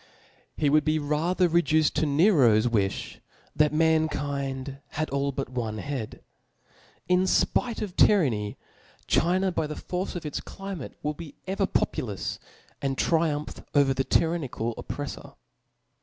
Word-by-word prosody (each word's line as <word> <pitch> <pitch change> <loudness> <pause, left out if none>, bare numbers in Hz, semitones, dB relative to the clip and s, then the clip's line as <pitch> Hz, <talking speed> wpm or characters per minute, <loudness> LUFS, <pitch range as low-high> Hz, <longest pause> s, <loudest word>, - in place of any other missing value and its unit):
He 150 - +1
would 150 +1 +4
be 155 +2 +1
rather 160 +5 +1
reduced 160 -2 +2
to 155 0 +2
Nero's 140 - +5
wi(h, 105 -5 -1 0.4
that 150 -1 +4
mankind 145 -4 0
had 155 +1 -2
all 140 0 0
but 135 -1 -4
one 115 -4 -3
head. 130 -2 -5 0.8
In 180 +1 +3
fpite 230 +4 +1
of 190 -4 -6
tyranny, 120 - +3 0.5
China 185 +2 +2
by 160 -3 -1
the 150 - -5
force 185 +2 -4
of 175 - -4
itscli* 195 +6 -5
mate 150 - -7
will 150 +1 0
be 155 -2 -10
ever 195 +1 0
populous^ 105 - -2 0.4
and 135 -1 -1
triumph 160 -3 0
over 140 -2 +4
the 135 - 0
tyrannical 140 -8 0
oppreffor. - - -7
150 Hz, 135 wpm, -27 LUFS, 135-170 Hz, 0.8 s, Nero's